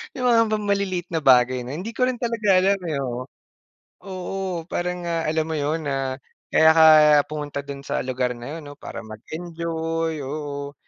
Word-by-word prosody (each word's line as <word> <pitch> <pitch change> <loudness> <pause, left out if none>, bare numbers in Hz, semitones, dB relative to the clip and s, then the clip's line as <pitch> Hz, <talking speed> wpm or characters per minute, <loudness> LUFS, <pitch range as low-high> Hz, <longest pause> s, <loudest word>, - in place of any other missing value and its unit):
Yung 255 - -2
mga 230 -1 +5
bang 210 -1 -1
maliliit 190 -3 0
na 165 - 0
bagay 125 -1 +5
na 130 - -6
hindi 185 +8 -5
ko 250 +2 +1
rin 255 -1 -1
talaga 230 -3 -1
alam 195 +1 +2
eh 155 -3 -2
oo. 125 -1 -4 0.8
Oo 185 -2 -4
parang 180 +1 -3
nga 165 -1 -1
alam 160 0 0
mo 160 - -4
yun 150 +2 -1
na 135 -1 -2 0.3
kaya 160 0 +5
ka 160 0 +6 0.5
pumunta 145 -2 -4
dun 140 0 -9
sa - - -1
lugar 125 -1 -1
na 120 +6 -7
yun 155 - -12
'no 145 0 -10
para - - -7
mag-enjoy, 165 +6 -4
oo 145 0 -5
160 Hz, 180 wpm, -23 LUFS, 140-180 Hz, 0.8 s, ka